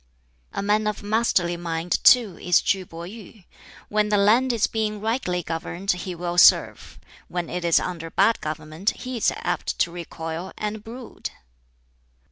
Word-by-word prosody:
"A - - -3
man 210 +1 +2
of 210 -1 -3
masterly 205 -5 +1
mind, 170 0 -2
too, 230 -8 +6
is 180 -1 +4
KŁ 190 -1 0
Pih 170 0 -9
yuh! 215 -2 -13 0.4
When 210 0 +1
the 210 - +3
land 225 +6 +4
is 230 -3 +2
being 215 -1 -2
rightly 210 -5 -1
governed 170 +4 -2
he 180 0 -4
will 175 +1 -1
serve; - - +4 0.3
when 175 -2 -4
it 180 0 -3
is 170 -1 +4
under 165 -2 -5
bad 225 +7 +2
government 155 +5 -2
he 255 -1 -5
is 225 - +2
apt - - -3
to 170 - +1
recoil, 170 +1 -6
and 210 0 -4
brood." 235 +2 -8
190 Hz, 160 wpm, -24 LUFS, 170-215 Hz, 0.4 s, too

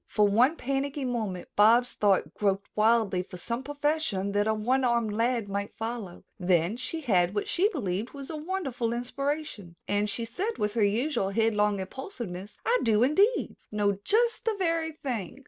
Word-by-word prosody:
For 210 -1 +3
one 245 +10 +4
panicky 275 0 -2
moment 220 -7 -3
Bobs' 230 +4 +5
thoughts 200 -2 +2
groped 200 -1 0
wildly 215 -4 +3
for 180 0 -10
some 235 +7 -3
profession 290 -8 -1
that 205 +1 +1
a 220 - +3
one 250 +5 +1
armed 235 -3 +1
lad 230 0 0
might 200 +1 -4
follow, 225 -5 -5 0.2
then 180 +1 +2
she 260 +6 -4
had 185 - +2
what 205 - -1
she 385 +4 +2
believed 215 - -2
was 280 +1 -8
a - - -4
wonderful 300 -8 -2
inspiration, 250 - -3
and 205 +1 +1
she 230 +3 -2
said 400 - -3
with 210 0 -1
her 230 - +2
usual 215 +1 +1
head 225 +2 +2
long 210 -1 +2
impulsiveness: 200 - -7
"I 485 +2 +3
do, 220 -1 +3
indeed, 390 - +2 0.2
know 205 -2 +1
just 460 - +1
the 450 -2 +1
very 330 -3 0
thing. 250 - -5
230 Hz, 175 wpm, -28 LUFS, 205-280 Hz, 0.2 s, Bobs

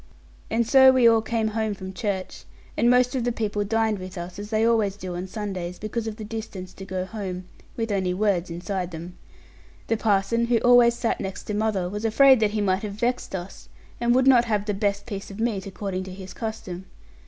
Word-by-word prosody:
And 230 +1 +1
so 265 +2 +7
we 255 -2 +5
all 225 -1 +5
came 220 0 -1
home 220 -1 -1
from 190 -1 -8
church; 195 -3 -4 0.3
and 235 - +3
most 250 0 +4
of 255 - 0
the 245 - +1
people 210 -3 -1
dined 220 0 0
with 185 -1 -8
us, 175 +3 -7
as 205 0 -7
they 220 0 +2
always 220 -4 +2
do 185 -3 -6
on 180 +2 -4
Sundays, 185 -3 -5
because 220 +2 -4
of 220 - -4
the 220 - -8
distance 210 -4 -7
to 195 - -9
go 185 -1 -3
home, 185 -3 -5 0.3
with 225 -2 -2
only 190 -2 0
words 185 -2 0
inside 180 +1 -3
them. 170 +1 -8 0.7
The 225 - 0
parson, 220 +2 +1
who 240 -1 +3
always 245 -1 +6
sat 230 -1 -1
next 190 -1 -5
to 210 - -4
mother, 205 -4 0
was 210 +4 -5
afraid 260 +3 +6
that 215 -1 +3
he 210 0 -2
might 190 -1 +1
have 210 -2 -5
vexed 240 0 -2
us, 180 +1 -8 0.3
and 240 0 +2
would 260 0 +4
not 250 -3 +6
have 210 -3 0
the 210 - -1
best 200 0 -1
piece 200 -4 -6
of 200 +1 -9
meat, 215 -4 -1
according 190 -1 -4
to 190 - -8
his 185 0 -9
custom. 190 -5 -6
210 Hz, 220 wpm, -25 LUFS, 190-225 Hz, 0.7 s, so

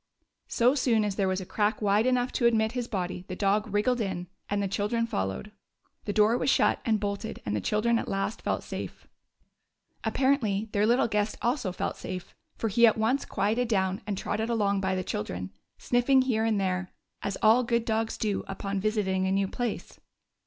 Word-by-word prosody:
So 245 +2 +3
soon 235 -6 +2
as 200 -2 -2
there 195 -1 +1
was 185 0 0
a - - -6
crack 210 +3 0
wide 210 +2 +2
enough 250 0 +1
to 235 - +2
admit 220 -1 +2
his 245 -1 -3
body 180 -4 -3
the 185 - -5
dog 205 +2 +1
wriggled 230 +4 +1
in 190 -4 -3 0.2
and 205 - 0
the 200 - 0
children 210 +4 0
followed. 95 - -3 0.5
The 205 - -1
door 215 +3 +3
was - - +1
shut - - +3
and 220 -2 +1
bolted, 205 +2 -4
and 105 0 -1
the 105 - -1
children 230 - +1
at - - -5
last 195 +3 -2
felt - - -1
safe. - - -7 1.0
Apparently 225 -6 +1
their 210 +1 +2
little 240 +1 +3
guest 210 -1 -1
also 240 -5 0
felt 180 - -3
safe, 185 -1 -7 0.2
for 225 - -2
he 235 +3 +5
at 220 - +3
once 230 +6 +1
quieted 225 +5 0
down 190 -3 0
and 205 -2 -2
trotted 220 +3 -2
along 200 -4 +1
by 190 -1 0
the 185 - -2
children, 90 - -4 0.3
sniffing 255 +2 +3
here 225 -4 +1
and 220 -2 +1
there, 185 -1 -1 0.3
as 200 - -3
all 220 +3 +6
good 235 -1 0
dogs 225 0 -1
do 210 -3 -1
upon 195 0 -3
visiting 190 -3 0
a - - 0
new 195 0 +1
place. 240 +2 -4
210 Hz, 195 wpm, -28 LUFS, 195-230 Hz, 1.0 s, all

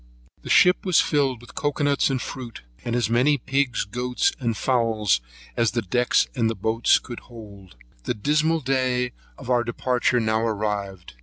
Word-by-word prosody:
The - - -10
ship 180 +1 +5
was 185 -4 +3
filled 135 -5 +1
with 120 - -15
cocoa 145 0 -2
nuts 145 -1 +2
and 135 -1 -1
fruit, 125 -3 -7 0.2
as 120 -1 0
many 125 +6 +3
pigs, 135 0 0
goats, 125 +4 -1
and 115 -4 -2
fowls, 115 - +1 0.3
as 115 -2 +2
the 120 -1 -1
decks 120 +6 +2
and 115 -4 +1
boats 110 +4 +3
would 120 - -7
hold. 100 - -13 0.3
The - - -1
dismal 150 +8 +1
day 125 -2 0 0.3
of 130 -2 -6
our 120 -1 +3
departure 125 +1 0
now 110 -1 +1
arrived. 105 -4 -3
120 Hz, 160 wpm, -24 LUFS, 110-130 Hz, 0.3 s, ship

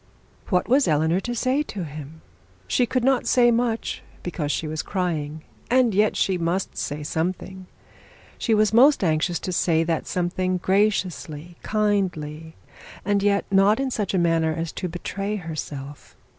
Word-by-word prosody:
What 180 -3 +1
was 265 +3 +4
Eleanor 160 +3 +2
to 240 +4 -4
say 255 +4 +1
to 210 -10 -5
this? 150 -1 -7 0.6
She 245 - +2
could 255 +1 0
not 265 0 +2
say 240 -1 +5
much, 230 -1 -1 0.2
because 160 -4 -2
she 155 +3 -2
was 155 0 -3
crying, 155 -5 -3 0.3
and 245 -3 +4
yet 210 +2 +2
she 185 -2 +1
must 170 +3 -1
say 150 +1 -4
something. 185 +4 -3 0.7
She 225 - +2
was 215 0 +3
most 270 +2 +6
anxious 165 +1 +1
to 185 - -3
say 165 -2 +2
that 165 -1 -2
something 185 +1 -1
graciously, 180 -4 0
kindly, 175 -7 -1 0.5
and 200 0 +2
yet 200 0 +2
not 200 +3 +4
in 270 -1 -1
such 210 -5 -1
a - - +3
manner 165 -2 +2
as 165 +1 -3
to 180 - -4
betray 195 +4 -4
herself. 150 -6 -7
185 Hz, 155 wpm, -24 LUFS, 160-215 Hz, 0.7 s, most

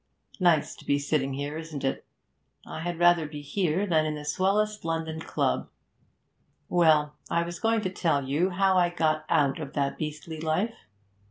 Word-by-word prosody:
'Nice 170 -5 +3
to - - -15
be 140 - +2
sitting 140 -2 -1
here, 145 +3 -4
isn't 160 -4 -7
it? 135 - -1 0.6
I - - -7
had 175 +1 -3
rather 175 -2 +4
be 150 -1 -8
here 180 +4 0
than 160 -5 +2
in 155 - -2
the 150 0 -7
swellest 210 +6 +1
London 165 -1 -2
club. 65 - -1 1.0
Well, 155 -4 +4 0.2
I 170 - +1
was 170 0 -6
going 225 0 +2
to 185 -3 -2
tell 145 -7 0
you 155 +7 +1
how 190 0 +3
I 175 -1 +3
got 155 -3 0
out 145 -4 +2
of 145 -3 -6
that 140 -1 -1
beastly 155 +1 -5
life. 170 +8 0
160 Hz, 175 wpm, -27 LUFS, 150-175 Hz, 1.0 s, rather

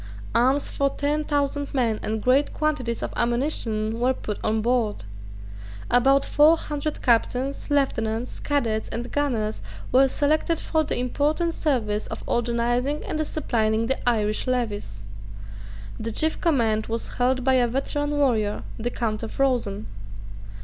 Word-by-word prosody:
Arms 265 +4 +3
for 280 0 0
ten 295 +2 -1
thousand 285 -1 -1
men 230 -5 +1
and 220 0 -3
great 265 +3 +3
quantities 275 -7 -1
of - - -4
ammunition 235 -3 0
were 255 +2 +2
put 210 -4 -5
on 220 +1 +1
board. 230 - 0 0.9
About 270 +3 +4
four 310 +3 +5
hundred 300 -1 -4
captains, 255 +4 +1
lieutenants, 240 -5 0
cadets 230 -7 -1
and 240 +1 -5
gunners 235 -7 -1 0.3
were 265 +2 +6
selected 310 +4 +1
for 315 0 0
the 295 - -2
important 295 +7 0
service 220 -10 -1
of - - -6
organizing 240 +4 0
and 310 - -3
disciplining 230 -8 0
the 255 0 0
Irish 215 0 0
levies. 205 - -2 1.0
The 230 +1 -3
chief 315 +8 0
command 230 -10 +1
was 230 +1 -4
held 255 +1 +2
by 265 +1 +3
a 250 -2 +4
veteran 285 +4 -1
warrior, 245 -8 +1 0.2
the 235 +2 -1
Count 225 -3 -2
of 225 +3 -7
Rosen. 245 - 0
250 Hz, 140 wpm, -24 LUFS, 225-285 Hz, 1.0 s, were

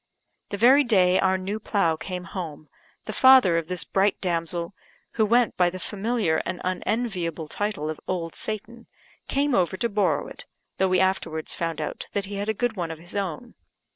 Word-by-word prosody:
The 200 - -3
very 260 +7 +6
day 185 -7 +4
our 190 0 +3
new 195 +3 -4
plough 195 -7 +1
came 180 +2 -6
home, 160 -5 -7 0.4
the - - -5
father 260 -10 +7
of 165 - -7
this 180 -4 -1
bright 195 +5 +1
damsel, 170 0 -2 0.4
who 220 - +2
went 235 +1 +3
by 180 -1 +4
the 185 - -7
familiar 210 -3 -1
and 175 +1 -3
unenviable 185 -4 -2
title 205 -4 -3
of 155 -1 -4
Old 170 -3 -2
Satan, 230 +2 -5 0.4
came 280 0 +1
over 185 -4 +2
to 235 - 0
borrow 205 -1 +1
it - - -9 0.3
(though 190 - +3
we 185 - +3
afterwards 170 -4 0
found 165 -2 -3
out 150 - -5
that 200 -1 -1
he 200 0 -6
had 205 +2 -2
a 220 - 0
good 245 +1 -1
one 175 -4 -3
of 160 - -6
his 175 +4 -12
own). 200 +4 -3
190 Hz, 190 wpm, -25 LUFS, 170-215 Hz, 0.4 s, father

